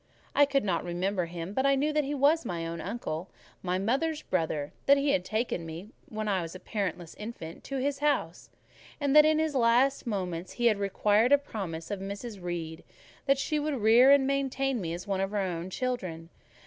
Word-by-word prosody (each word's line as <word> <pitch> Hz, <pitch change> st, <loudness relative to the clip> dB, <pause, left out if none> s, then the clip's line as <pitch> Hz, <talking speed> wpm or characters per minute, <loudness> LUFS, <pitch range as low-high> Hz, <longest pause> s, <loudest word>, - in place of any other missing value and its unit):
I 285 Hz, -, +6 dB
could 275 Hz, -1 st, +1 dB
not 180 Hz, -5 st, 0 dB
remember 180 Hz, +1 st, -1 dB
him; 170 Hz, +2 st, -6 dB
but 265 Hz, -, +1 dB
I 275 Hz, 0 st, +4 dB
knew 295 Hz, +3 st, 0 dB
that 300 Hz, 0 st, +2 dB
he 285 Hz, +1 st, -3 dB
was 290 Hz, +4 st, +3 dB
my 170 Hz, -7 st, -3 dB
own 165 Hz, 0 st, -5 dB
uncle—my 185 Hz, -2 st, -5 dB
mother's 275 Hz, +10 st, 0 dB
brother—that 160 Hz, -, +1 dB
he 280 Hz, 0 st, +2 dB
had 180 Hz, -, +1 dB
taken 215 Hz, -3 st, -2 dB
me 165 Hz, +5 st, -8 dB, 0.2 s
when 215 Hz, -1 st, -4 dB
a 190 Hz, -4 st, +1 dB, 0.2 s
parentless 180 Hz, -6 st, -3 dB
infant 210 Hz, -7 st, -8 dB
to 275 Hz, -, -4 dB
his 275 Hz, +1 st, -1 dB
house; 280 Hz, -, -1 dB, 0.5 s
and 285 Hz, -1 st, +1 dB
that 300 Hz, 0 st, +9 dB
in 310 Hz, 0 st, +4 dB
his 315 Hz, -1 st, 0 dB
last 250 Hz, +2 st, +3 dB
moments 180 Hz, -5 st, -3 dB
he 240 Hz, -, -2 dB
had 215 Hz, -3 st, +4 dB
required 205 Hz, +4 st, +2 dB
a 285 Hz, -, +8 dB
promise 190 Hz, -12 st, -6 dB
of 200 Hz, -, -2 dB
Mrs. 200 Hz, +2 st, -6 dB
Reed 170 Hz, -2 st, -5 dB, 0.4 s
that 275 Hz, 0 st, +4 dB
she 300 Hz, +2 st, -1 dB
would 300 Hz, 0 st, -1 dB
rear 235 Hz, +3 st, +6 dB
and 280 Hz, -1 st, +6 dB
maintain 270 Hz, -2 st, 0 dB
me 165 Hz, -2 st, -3 dB
as 175 Hz, -, -8 dB
one 195 Hz, -2 st, -1 dB
of 195 Hz, -, 0 dB
her 210 Hz, -, -3 dB
own 180 Hz, -2 st, -2 dB
children. 185 Hz, -9 st, -4 dB
215 Hz, 195 wpm, -29 LUFS, 180-275 Hz, 0.5 s, that